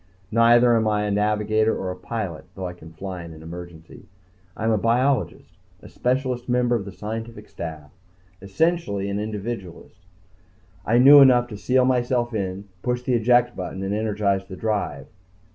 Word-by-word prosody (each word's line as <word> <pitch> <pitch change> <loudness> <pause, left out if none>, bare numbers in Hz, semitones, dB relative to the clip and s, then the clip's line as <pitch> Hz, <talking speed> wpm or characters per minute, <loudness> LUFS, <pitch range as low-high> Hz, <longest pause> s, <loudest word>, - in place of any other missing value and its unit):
Neither 120 +1 +5
am 110 -1 +1
I 105 -1 +1
a 105 - -1
navigator 105 +1 +1
or 95 - -3
a - - -6
pilot, 90 -3 -5
although 95 -1 -4
I 90 - -7
can 80 -2 -14
fly 90 +1 -7
in 85 -1 -10
an 80 - -13
emergency. 85 -1 -11 0.5
I - - -5
am 115 - +2
a 110 - +2
biologist, 125 +5 0 0.2
a - - -11
specialist 125 -1 -2
member 125 0 +2
of 105 -5 -3
the 100 - -7
scientific 110 +3 -7
staff 80 -2 -8 0.5
essentially 100 - -1
an 100 - -2
individualist. 105 -4 -7 0.8
I 115 - +3
knew 140 +3 +9
enough 125 -3 +5
to 105 - -7
seal 125 +5 +2
myself 120 -1 0
in, 100 -1 -4
push 125 +2 -2
the 125 - 0
eject 120 +1 +3
button 95 +1 -5
and 95 +1 -2
energize 105 -2 0
the 95 - -8
drive. 105 +1 -2
110 Hz, 170 wpm, -23 LUFS, 95-120 Hz, 0.8 s, knew